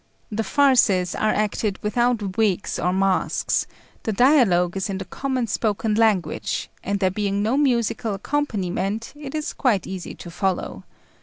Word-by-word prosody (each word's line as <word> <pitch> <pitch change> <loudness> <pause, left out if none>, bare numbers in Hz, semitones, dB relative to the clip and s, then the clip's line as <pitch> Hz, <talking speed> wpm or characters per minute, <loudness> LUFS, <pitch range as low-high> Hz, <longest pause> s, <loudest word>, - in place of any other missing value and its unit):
The 220 +1 -1
farces 220 -8 +3
are 215 - 0
acted 210 -1 0
without 215 -3 0
wigs 205 -4 0
or 180 - +1
masks; 190 0 +1 0.3
the 220 - -2
dialogue 200 - +4
is 195 +1 -2
in 195 - -2
the 190 - -5
common 260 +5 -2
spoken 215 0 0
language, 210 -7 0
and 200 +1 -1
there 190 -1 +2
being 200 0 -1
no 225 +5 +1
musical 235 -6 +1
accompaniment 210 -4 -2
it 290 -1 -7
is 305 -1 -3
quite 225 -8 +1
easy 190 -2 -6
to 175 - -10
follow. 190 +1 -2
210 Hz, 150 wpm, -23 LUFS, 190-240 Hz, 0.3 s, dialogue